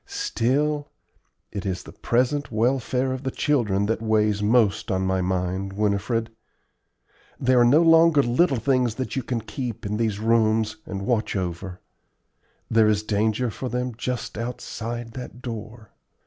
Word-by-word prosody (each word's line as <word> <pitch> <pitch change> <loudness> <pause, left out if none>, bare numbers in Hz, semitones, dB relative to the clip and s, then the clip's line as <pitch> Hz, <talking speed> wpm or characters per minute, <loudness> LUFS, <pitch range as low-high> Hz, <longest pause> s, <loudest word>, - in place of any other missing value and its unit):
Still, 150 - 0 0.6
it 100 -3 -5
is 95 -2 -3
the - - -11
present 130 +4 0
welfare 125 +3 +1
of 130 - -5
the 135 - -2
children 115 -9 +1
that 115 +1 -1
weighs 105 -2 +2
most 110 -1 +2
on 95 -1 0
my 95 0 +1
mind, 95 +1 -2
Winifred. 105 +3 0 1.1
They 130 0 +2
are 125 -1 +6
no 140 +8 +5
longer 165 -3 +6
little 135 +4 +2
things 125 -2 +1
that 130 +1 -4
you 135 - 0
can 120 -1 -3
keep 120 -2 -5
in 105 +1 -2
these 110 -3 0
rooms 110 -1 +2
and 100 -1 -4
watch 115 -3 0
over; 90 0 -4 0.9
there 110 -1 +4
is 105 0 +2
danger 110 +3 0
for 130 +4 -5
them 125 +1 -2
just 125 -2 -4
outside 120 0 -5
that 125 0 -8
door. 110 -2 -7
115 Hz, 150 wpm, -24 LUFS, 105-125 Hz, 1.1 s, are